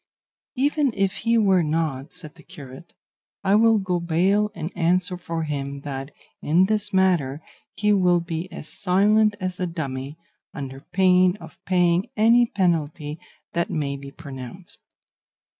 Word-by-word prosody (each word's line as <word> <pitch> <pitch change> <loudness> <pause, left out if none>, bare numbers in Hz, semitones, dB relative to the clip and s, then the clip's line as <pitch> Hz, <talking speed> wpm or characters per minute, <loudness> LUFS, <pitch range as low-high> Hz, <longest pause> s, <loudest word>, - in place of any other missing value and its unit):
"Even 285 +1 +1
if 195 -1 0
he 230 +1 +1
were 195 -4 +4
not," 155 -4 -2
said 155 -3 -7
the 170 - -17
curate, 150 -3 -12 0.5
"I 195 0 +2
will 225 +1 +5
go 185 -3 -1
bail 185 +5 +2
and 165 0 -6
answer 180 +1 +1
for 165 -2 -4
him 140 -2 -4
that 135 -1 -5 0.3
in 170 +5 +3
this 210 0 +1
matter 175 -8 +2 0.4
he 210 0 +2
will 180 -3 +3
be 170 +1 -5
as - - -8
silent 205 +4 +2
as 185 -1 -4
a 180 - -1
dummy, 140 -3 -5 0.4
under 135 -1 -6
pain 185 +3 +3
of - - -14
paying 180 0 +2
any 235 +3 +5
penalty 160 -6 -1 0.3
that 170 0 0
may 140 -3 -2
be 140 0 -9
pronounced." 140 +3 -9
175 Hz, 145 wpm, -23 LUFS, 150-195 Hz, 0.5 s, will